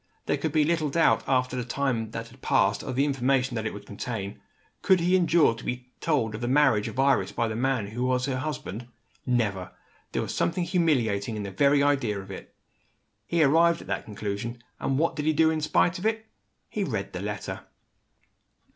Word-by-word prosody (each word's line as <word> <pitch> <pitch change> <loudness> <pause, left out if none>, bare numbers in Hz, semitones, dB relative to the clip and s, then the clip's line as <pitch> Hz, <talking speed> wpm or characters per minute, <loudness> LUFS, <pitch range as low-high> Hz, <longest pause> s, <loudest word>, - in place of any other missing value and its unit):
There - - +1
could - - -2
be 155 - +3
little 160 -1 +1
doubt, 165 +4 +3
after 130 -1 +1
the 125 - -2
time 125 -3 -1
that 115 +1 -6
had 125 +3 -18
passed, - - +2
of 130 -3 -5
the 135 +2 +3
information 135 -2 +1
that 110 -1 -2
it - - -3
would 100 0 -10
contain. 100 -1 -5 0.4
Could 190 -1 +4
he 175 +2 +3
endure 170 -7 +4
to 115 - -11
be 125 0 -5
told 135 -9 +1
of 105 - -6
the 120 - -1
marriage 130 -6 +3
of - - -6
Iris, 135 0 +3
by 115 - 0
the 110 - -3
man 125 -2 0
who 120 +4 -3
was 125 0 +1
her 130 -2 -2
husband? 125 -6 -5 0.4
Never! 105 -7 0 0.4
There - - -1
was - - -4
something 170 +1 0
humiliating 125 - +1
in 105 - -4
the 100 - -5
very 140 +7 +3
idea 135 -8 +1
of 95 0 -9
it. 95 - -10 0.7
He 170 -2 +3
arrived 165 +4 +4
at - - -12
that - - -2
conclusion 105 +3 -5 0.2
and 135 - 0
what 165 +2 +1
did 150 -1 -3
he 155 - +3
do 160 +1 +4
in 160 -1 -1
spite 175 +4 +2
of 185 - -6
it? 220 0 -1 0.4
He 210 - -2
read 110 - -3
the 90 - -4
letter. 105 0 -5
130 Hz, 210 wpm, -27 LUFS, 110-155 Hz, 0.7 s, Could